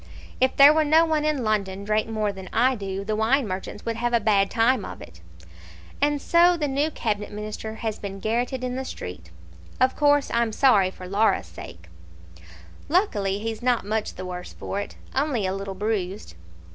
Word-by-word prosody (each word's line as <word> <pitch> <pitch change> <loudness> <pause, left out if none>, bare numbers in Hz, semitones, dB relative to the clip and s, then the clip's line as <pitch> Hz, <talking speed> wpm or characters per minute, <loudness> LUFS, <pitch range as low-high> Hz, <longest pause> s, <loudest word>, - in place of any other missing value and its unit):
"If 260 0 +2
there 280 +2 +9
were 315 0 +3
no 315 +2 +5
one 310 -2 0
in 300 -4 0
London 200 -3 -1
drank 215 +1 0
more 215 -2 -1
than 190 -1 -9
I 255 +3 +3
do, 195 -3 -5
the 215 +1 -1
wine 230 +4 +2
merchants 190 +2 -6
would 230 -1 -2
have 240 +1 -1
a 235 - +4
bad 200 -2 +2
time 230 -1 +2
of - - -8
it. 80 0 -13 0.8
And 290 0 +2
so 345 +3 +4
the 300 -3 -1
new 285 +3 0
Cabinet 210 -8 -3
Minister 215 +1 -6
has 220 -1 -4
been 195 -1 -6
garrotted 245 +5 -1
in 250 0 -2
the 265 - -3
street. 90 - -8 0.5
Of 255 0 +3
course 290 -1 +3
I'm 235 -1 +1
sorry 210 -8 +4
for 185 - -12
poor 195 +2 -5
Laura's 220 - +3
sake." 85 0 -11 1.0
"Luckily 210 - +1
he's 225 +1 -4
not 245 -4 +1
much 215 +1 -2
the 185 - -7
worse 180 0 -7
for 200 - -4
it; 205 - -6 0.2
only 265 -6 0
a 185 - -1
little 195 0 -5
bruised." 200 - -3
220 Hz, 195 wpm, -24 LUFS, 195-260 Hz, 1.0 s, there